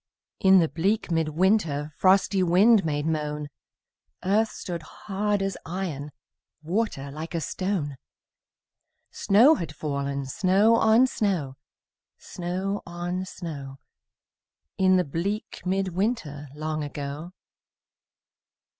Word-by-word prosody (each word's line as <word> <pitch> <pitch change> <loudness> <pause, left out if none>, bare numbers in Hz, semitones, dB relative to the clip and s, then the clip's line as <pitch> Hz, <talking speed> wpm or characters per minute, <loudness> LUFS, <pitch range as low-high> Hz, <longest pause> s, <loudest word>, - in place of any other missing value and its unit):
In 190 0 +6
the 170 -3 +4
bleak 195 +5 -1
mid 165 -2 +1
winter 155 -4 +1
Frosty 195 0 +3
wind 195 +5 +5
made 145 -2 -1
moan, 150 -2 -2 0.7
Earth 215 +4 +2
stood 175 -3 -6
hard 205 +4 -2
as 195 0 -2
iron, 160 -5 -4 0.5
Water 165 -6 -2
like 160 +3 -6
a - - +1
stone; 165 -5 -2 1.1
Snow 230 +10 +5
had 165 - -4
fallen, 140 -2 -3
snow 195 - +3
on 225 +2 +5
snow, 190 - -1 0.6
Snow 185 +3 -4
on 175 +2 -4
snow, 145 -7 -7 1.0
In 185 0 +4
the 180 - +2
bleak 185 +9 -3
mid 190 +1 0
winter 175 - -2
Long 155 0 -3
ago. 145 +4 -6
175 Hz, 110 wpm, -26 LUFS, 150-195 Hz, 1.1 s, In